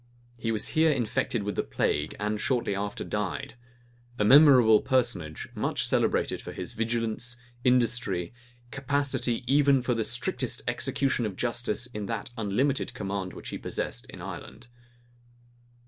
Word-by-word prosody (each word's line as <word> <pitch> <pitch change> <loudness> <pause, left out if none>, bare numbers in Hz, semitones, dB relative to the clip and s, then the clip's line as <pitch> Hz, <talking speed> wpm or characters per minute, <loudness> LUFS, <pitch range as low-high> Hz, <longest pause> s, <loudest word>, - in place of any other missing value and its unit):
He 115 -1 -2
was 110 -1 -1
here 160 +1 +3
infected 120 -3 -1
with 100 -1 -3
the - - +1
plague, 75 +1 -1
and 105 0 -1
shortly 120 -6 0
after 100 +1 -3
died; 105 -3 -3 0.6
a 105 - +1
memorable 125 -4 +7
personage, 95 - -1
much - - -1
celebrated - - +1
for - - -7
his - - -5
vigilance, 115 +1 -1 0.3
industry, 120 -7 +1 0.4
capacity 135 -3 -1
even 140 0 +4
for 125 - +1
the 115 -1 0
strict 120 +3 0 0.2
execution 130 -4 0
of 100 - -6
justice 120 -1 0
in 105 -5 -5
that 115 +1 -4
unlimited 125 +6 0
command 95 -2 -4
which - - -8
he - - -5
possessed - - -3
in - - -10
Ireland. 120 - -9
115 Hz, 140 wpm, -28 LUFS, 105-125 Hz, 0.6 s, memorable